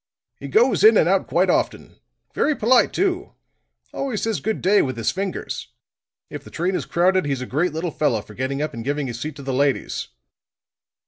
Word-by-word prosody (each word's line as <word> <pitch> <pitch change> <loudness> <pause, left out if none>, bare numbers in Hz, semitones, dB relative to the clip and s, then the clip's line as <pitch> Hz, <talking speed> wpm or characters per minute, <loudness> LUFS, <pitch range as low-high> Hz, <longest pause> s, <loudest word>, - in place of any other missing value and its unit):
He - - -7
goes 445 0 +3
in 435 - +8
and - - +4
out - - +2
quite - - +2
often. - - -2 0.3
Very 305 - +1
polite 240 +2 +3
too. 370 -1 -1 0.6
Always 260 -6 -3
says 225 -2 -1
good 220 0 -2
day 200 +2 +4
with 130 -3 -3
his 115 - 0
fingers; 195 0 -4 0.6
if - - -8
the - - -12
train 180 +3 -1
is - - -3
crowded, 185 0 +2
he's 135 -3 -2
a - - -3
great 155 +8 0
little 160 +2 -3
fellow 130 -10 0
for 105 - -14
getting 130 +5 -2
up 155 - -4
and 115 - -6
giving 145 +2 -1
his 120 -2 -5
seat 150 +3 -5
to 140 - -10
the 135 0 -3
ladies." 140 +1 0
155 Hz, 200 wpm, -22 LUFS, 135-205 Hz, 0.6 s, in